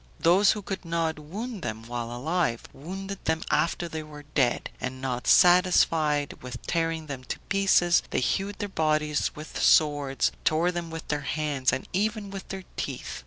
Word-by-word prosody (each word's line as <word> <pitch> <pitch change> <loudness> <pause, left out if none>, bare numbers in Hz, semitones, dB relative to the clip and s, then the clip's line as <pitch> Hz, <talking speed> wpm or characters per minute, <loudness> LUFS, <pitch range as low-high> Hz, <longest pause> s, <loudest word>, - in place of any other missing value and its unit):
Those 185 +5 +5
who 210 - -6
could 190 0 -5
not 165 -2 -1
wound 205 +8 -6
them 110 -4 -4
while 120 0 -5
alive, 130 0 -1
wounded 195 +7 -7
them 160 0 0
after 170 +1 +1
they 160 -1 -5
were 150 -1 -11
dead; 140 -4 0
and 130 0 -4
not 125 -2 -3
satisfied 165 -5 +4
with 125 0 -7
tearing 165 -1 -1
them 140 -4 -6
to - - -4
pieces, 195 -3 +4
they - - 0
hewed 195 +10 -1
their 205 - -3
bodies 155 -4 0
with 155 +1 -6
swords, 145 -3 +3
tore 165 +3 +2
them 175 -1 -4
with 165 0 -7
their 150 -1 0
hands, 145 -3 0
and 130 +1 -3
even 210 +1 -1
with 195 -1 -7
their 190 -1 -6
teeth. - - -4
160 Hz, 170 wpm, -27 LUFS, 145-185 Hz, -, Those